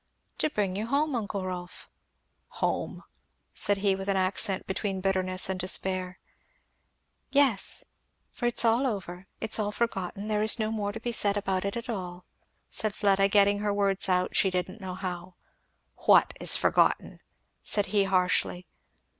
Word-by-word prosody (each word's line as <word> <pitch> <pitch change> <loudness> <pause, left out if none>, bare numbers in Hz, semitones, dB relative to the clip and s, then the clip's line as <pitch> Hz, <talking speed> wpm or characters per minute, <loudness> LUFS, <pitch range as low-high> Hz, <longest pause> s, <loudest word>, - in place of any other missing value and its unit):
"To 310 - +1
bring 200 -8 -2
you 215 +3 -3
home, 290 +3 0
uncle 205 -4 -3
Rolf." 180 -1 -7 0.7
"Home!" - - -2 0.5
said 205 - 0
he, 195 - +4
with 195 0 -5
an 195 - +1
accent 190 +1 0
between 190 0 -3
bitterness 185 -1 0
and 190 -1 -3
despair. 185 0 0 1.1
"Yes, 275 -8 +1 0.5
for 240 - -3
it's 240 0 +1
all 235 +4 +3
over, 190 -4 -6
it's 220 0 0
all 210 -1 -1
forgotten 210 -2 -3
there 210 -1 0
is 215 +2 +6
no 215 -1 -2
more 205 -2 -2
to 225 - -7
be 240 +1 -3
said 205 -3 +2
about 190 -2 -2
it 200 +3 -3
at 235 - -6
all," 180 -5 -6 0.4
said 215 -2 -2
Fleda, 195 -1 +3
getting 200 0 +3
her 205 0 -1
words 200 -1 +1
out 180 0 0
she 195 - +4
didn't 185 +3 -4
know 185 -1 -6
how. 180 -1 -6 0.6
"What - - +4
is - - +7
forgotten?" - - +1 0.4
said 205 -1 +1
he 200 -2 +3
harshly. 180 -1 +1
195 Hz, 160 wpm, -27 LUFS, 185-215 Hz, 1.1 s, is